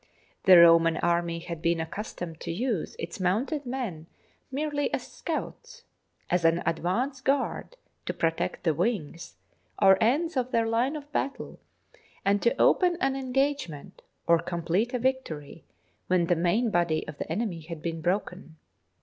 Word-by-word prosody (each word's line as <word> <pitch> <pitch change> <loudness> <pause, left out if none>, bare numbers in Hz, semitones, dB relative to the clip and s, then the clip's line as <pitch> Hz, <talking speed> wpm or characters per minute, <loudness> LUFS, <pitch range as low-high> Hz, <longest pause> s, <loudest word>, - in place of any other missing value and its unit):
The 185 -2 +9
Roman 165 -1 +6
army 170 -1 0
had 170 -1 -7
been 170 0 +2
accus 165 +7 -5
tomed 165 -3 -6
to - - -5
use 215 0 -2
its 170 +4 -6
mounted 245 - 0
men 225 -12 -4 0.4
merely 290 +1 -1
as - - -2
scouts, 485 -1 -6 0.4
as 180 -1 +1
an 165 +1 +3
advance 240 - -1
guard 280 - -1 0.3
to - - -1
protect 165 0 -1
the 165 -3 +2
wings, 170 -3 -3 0.4
or 195 -1 +6
ends 300 +9 +2
of 255 -1 0
their 230 -2 +1
line 235 +6 +1
of 295 -1 -8
battle, 275 -1 -3 0.7
and 200 0 +3
to 235 - +1
open 355 -2 +4
an 270 -3 +1
engagement 270 - -2 0.2
or 170 0 +4
complete 175 +8 -1
a - - +2
victory 230 - -3 0.4
when 180 -2 +2
the 175 - +2
main 180 +8 +1
body 170 -4 +1
of 150 -1 -9
the - - -5
enemy 180 -2 -2
had 160 -1 -8
been 165 -1 -3
broken. 180 -2 -2
185 Hz, 155 wpm, -27 LUFS, 165-260 Hz, 0.7 s, The